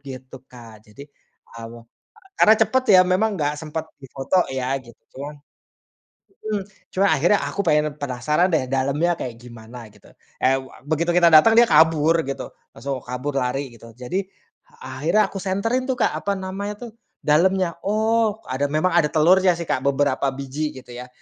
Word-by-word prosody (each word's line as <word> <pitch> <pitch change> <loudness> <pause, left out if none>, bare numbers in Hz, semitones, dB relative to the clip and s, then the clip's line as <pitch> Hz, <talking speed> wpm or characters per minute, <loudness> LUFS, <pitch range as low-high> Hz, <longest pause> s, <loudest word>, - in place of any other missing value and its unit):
gitu 130 -2 -10
Kak. 110 -3 -15
Jadi, 140 +7 -12 0.5
eee, 115 0 -10 0.6
karena 220 - +7
cepet 255 +4 +1
ya 185 - +9
memang 195 +4 +1
nggak 150 -3 -2
sempat 160 +1 -6
difoto 135 +6 -1
ya 130 -1 -3
gitu, 120 -3 -16 0.2
cuman 145 +3 -8 1.2
mhm. 205 -2 -1 0.3
Cuma 195 +1 +2
akhirnya 175 +8 +3
aku 200 - -4
pengen, 150 -2 +1
penasaran 145 +6 0
deh, 130 -5 0
dalemnya 140 +6 0
kayak 120 -6 -6
gimana 120 -1 -12
gitu. 105 -1 -21 0.3
Eee, 135 +1 +1 0.2
begitu 160 +3 -1
kita 175 -1 +6
datang, 220 +9 +7
dia 240 - +8
kabur 160 +1 +4
gitu. 135 - -6 0.2
Langsung 135 -1 -4
kabur 130 +3 -4
lari 130 +1 -3
gitu. 115 0 -14
Jadi 125 +10 -3 0.6
akhirnya 155 +11 0
aku 195 - -5
senterin 225 +8 -1
tuh 260 - 0
Kak, 235 - +1
apa 200 -1 -2
namanya 195 +2 -5
tuh - - -12 0.3
dalemnya. 175 +3 +2
Oh, 220 +1 +1
ada 135 +2 -1
memang 155 +4 +1
ada 165 -3 +3
telurnya 180 +4 +4
sih 170 - -5
Kak, - - 0
beberapa 140 0 +1
biji 140 +3 -4
gitu 125 -1 -12
ya. 125 +1 -9
150 Hz, 160 wpm, -22 LUFS, 130-185 Hz, 1.2 s, ya